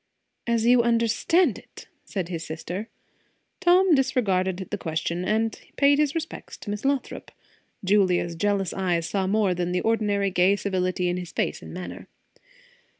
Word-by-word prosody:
"As 230 -1 +1
you 245 0 +6
understand 235 - +2
it!" - - -14 0.2
said 190 -5 -3
his 165 -2 -4
sister. 175 +7 -6 0.7
Tom 365 0 +5
disregarded 195 -9 +1
the 205 - -1
question, 170 +1 -2
and 220 +3 0
paid 285 0 +4
his 300 0 +1
respects 330 0 -6
to 205 - -6
Miss 205 0 -4
Lothrop. 275 -2 -2 0.5
Julia's 185 -3 +2
jealous 200 +2 0
eyes 175 -3 0
saw 195 -2 -1
more 205 -1 +2
than 180 0 -2
the 180 - +1
ordinary 205 -3 +1
gay 185 +2 +4
civility 185 -2 -1
in 175 0 0
his 180 -1 -6
face - - -2
and - - -10
manner. 180 0 -8
200 Hz, 150 wpm, -25 LUFS, 180-235 Hz, 0.7 s, you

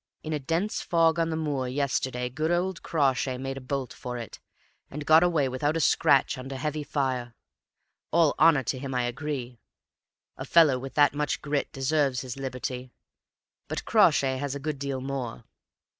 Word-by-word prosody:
In 155 - -3
a 150 - -1
dense 165 +10 -1
fog 165 -1 +2
on 165 0 +1
the 160 - -2
moor 145 -5 -2
yesterday 130 -2 -1
good 155 +6 -2
old 175 +1 0
Crawshay 135 -4 0
made 135 +1 -4
a - - -7
bolt 130 0 -3
for 125 -1 -6
it, 115 -3 -8 0.5
and 150 +1 -6
got 160 +2 +7
away 165 -6 +2
without 145 +5 -1
a - - 0
scratch 140 -3 +3
under 135 +1 -6
heavy 150 +2 -3
fire. 130 -5 -2 0.7
All 165 -2 +4
honor 155 -4 +5
to 130 - -2
him, 135 -1 -5
I 125 - +1
agree; 125 -1 -4 0.8
a - - -6
fellow 155 -6 +5
with 135 +1 -8
that 145 -2 +5
much 150 0 -1
grit 145 -1 -1
deserves 135 -1 0
his 125 -3 -6
liberty. 130 -1 -5 0.8
But - - -4
Crawshay 130 -1 +4
has 140 0 -3
a - - -4
good 145 0 -4
deal 135 -2 -3
more. 130 - -4
140 Hz, 175 wpm, -27 LUFS, 130-155 Hz, 0.8 s, got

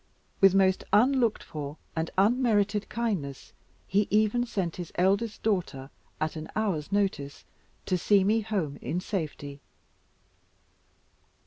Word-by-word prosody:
With 195 -1 +6
most 190 -1 +3
unlooked 240 0 +3
for 150 0 -7 0.2
and 160 0 -1
unmerited 210 -1 +2
kindness, 195 - -3 0.3
he 200 +1 +1
even 215 +3 +2
sent 185 -7 -3
his 175 -2 -6
eldest 200 +4 +1
daughter, 175 -10 -1 0.3
at 155 +1 -2
an 155 0 -6
hour's 190 -8 -1
notice, 190 -9 -1 0.4
to 185 -2 0
see 200 +2 +4
me 215 +3 +2
home 195 -10 -3
in 175 - -2
safety. 150 -7 -5
195 Hz, 120 wpm, -28 LUFS, 160-215 Hz, 0.4 s, With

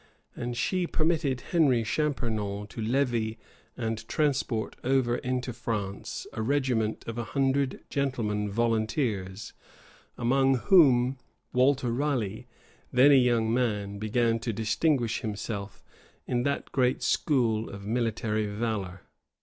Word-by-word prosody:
And 120 0 -4
she 180 +7 0
permitted 155 -6 0
Henry 140 -9 +4
Champernon 110 -7 -1
to 115 - -7
levy, 115 -2 0 0.4
and 115 -1 -3
transport 135 -7 0
over 125 -2 +2
into 125 0 -2
France, 105 -4 -4
a 110 - -3
regiment 125 -4 0
of 115 +1 -4
a - - -1
hundred 135 +2 0
gentlemen 110 -7 -1
volunteers; 110 -2 -1 0.6
among 135 +2 +3
whom 130 -5 +4 0.3
Walter 130 -1 +3
Raleigh, 120 -6 -1 0.4
then 130 +4 +6
a - - +7
young 120 -3 +3
man, 105 -5 -1
began 115 +2 +1
to 115 - -2
distinguish 115 +3 0
himself, 105 -1 -5 0.4
in 120 -1 0
that 140 +2 -2
great 125 -1 +1
school 115 -7 +1
of 100 0 -9
military 110 -1 -1
valor. 100 -4 -3
120 Hz, 115 wpm, -28 LUFS, 110-135 Hz, 0.6 s, a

